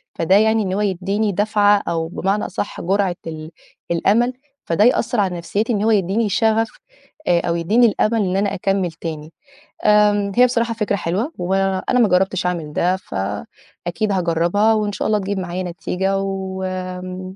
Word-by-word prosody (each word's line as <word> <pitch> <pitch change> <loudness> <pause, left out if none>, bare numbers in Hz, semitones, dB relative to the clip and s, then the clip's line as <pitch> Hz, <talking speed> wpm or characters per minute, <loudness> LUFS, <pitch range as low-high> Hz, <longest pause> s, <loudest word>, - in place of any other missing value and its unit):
فده 185 +4 +2
يعني 220 +1 +3
إن 185 -1 -2
هو 200 - 0
يدّيني 200 +2 0
دَفعة 205 +1 +3
أو 165 -1 -1
بمعنى 195 +4 -1
أصح 200 - -5
جُرعة 190 0 +1
ال 155 0 -7 0.4
الأمل، 215 +9 +2 0.3
فده 170 +5 +2
يأثّر 240 0 +2
على 185 -3 0
نَفْسيتي 210 +7 -1
إن 205 -1 0
هو 225 - +3
يدّيني 205 +2 +1
شغف 220 +2 +2 0.6
آآ 175 -1 +4
أو 170 - -1
يدّيني 210 +9 +3
الأمل 225 0 +2
إن 185 -2 0
أنا 200 0 0
أكمِّل 190 -1 0
تاني. 160 -1 -7 0.5
آمم 210 -1 +4
هي 250 - +6
بصراحة 235 -2 0
فكرة 210 -2 -1
حلوة 200 - -2
وأنا 195 +5 0
ما 235 - +5
جرّبتش 185 0 +1
أعمل 165 -4 -2
ده، 180 +4 +1
فأكيد 170 - -5
هاجرّبها 180 +4 +2
وإن 210 -1 0
شاء - - -3
الله 215 -1 +2
تجيب 200 0 -3
معايا 180 0 -4
نتيجة 180 +2 -2
وآمم، 185 -1 -5
195 Hz, 165 wpm, -20 LUFS, 180-210 Hz, 0.6 s, هي